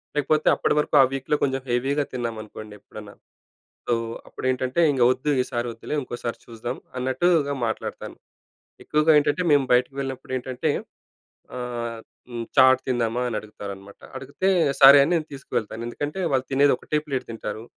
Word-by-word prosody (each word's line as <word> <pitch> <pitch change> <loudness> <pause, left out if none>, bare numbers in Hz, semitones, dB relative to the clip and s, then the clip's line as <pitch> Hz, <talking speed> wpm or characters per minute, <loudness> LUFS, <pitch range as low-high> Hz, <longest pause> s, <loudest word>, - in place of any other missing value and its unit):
లేకపోతే 150 +1 +1
అప్పటి - - 0
వరకు - - 0
ఆ - - +8
వీక్‍లో 135 +2 -1
కొంచెం 135 -1 0
హెవీగా 135 +4 +1
తిన్నామనుకోండి 110 -3 -6
ఎప్పుడన్నా. 105 -1 -12 0.7
సో, 120 - +1 0.3
అప్పుడేంటంటే 130 +3 -2
ఇంక 130 - -2
వద్దు 130 +4 -2
ఈసారి 120 -2 -3
వద్దులే 135 - -6
ఇంకోసారి 120 -2 -5
చూద్దాం 120 +2 -6 0.2
అన్నట్టుగా 140 +3 +1
మాట్లాడుతాను. 110 -1 -5 0.7
ఎక్కువగా 150 +1 +3
ఏంటంటే 150 +4 +1
మేము 145 -2 +4
బయటికి 125 +2 +2
వెళ్ళినప్పుడు 130 -1 -5
ఏంటంటే 125 0 -3 0.9
ఆహ్, 120 -2 -4 0.3
హ్మ్, 120 -1 -5
చాట్ 130 -1 +6
తిందామా 120 -2 0
అని 115 - -3
అడుగుతారనమాట. 100 -2 -10 0.2
అడిగితే 140 +8 -2 0.3
సరే 140 +1 +10
అని 150 - +1
నేను 160 -3 0
తీసుకువెళ్తాను. 115 -4 -4
ఎందుకంటే 145 +8 -4
వాళ్ళు 130 -1 +1
తినేది 140 +1 +4
ఒకటే 150 - -2
ప్లేట్ 135 -3 -3
తింటారు. 110 -1 -6
130 Hz, 140 wpm, -24 LUFS, 120-140 Hz, 0.9 s, సరే